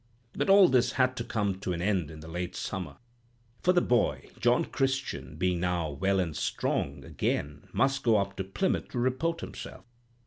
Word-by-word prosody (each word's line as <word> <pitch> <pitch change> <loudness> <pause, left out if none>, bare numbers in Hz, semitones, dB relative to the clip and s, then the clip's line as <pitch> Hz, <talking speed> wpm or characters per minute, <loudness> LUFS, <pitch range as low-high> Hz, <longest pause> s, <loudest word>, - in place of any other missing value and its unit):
"But - - -1
all 195 -1 +8
this 125 -3 +3
had 130 -1 +2
to 120 - -2
come 100 -5 -1
to 90 - -2
an 85 - -3
end 95 -6 +1
in 80 -1 -10
the 80 - -10
late 90 +2 -4
summer, 95 -3 -4 0.6
for 180 - +4
the 180 -1 +4
boy, 120 -3 +1
John - - +3
Christian, 130 - -2
being 90 +2 0
now 85 -3 0
well 95 +7 +1
and 85 -5 -1
strong 70 0 -1
again, 75 +1 -2
must 135 0 +1
go 115 -3 +4
up 100 -1 -1
to 95 - -1
Plymouth 95 - -1
to - - -6
report 130 +7 0
himself. - - -8
100 Hz, 185 wpm, -29 LUFS, 85-130 Hz, 0.6 s, all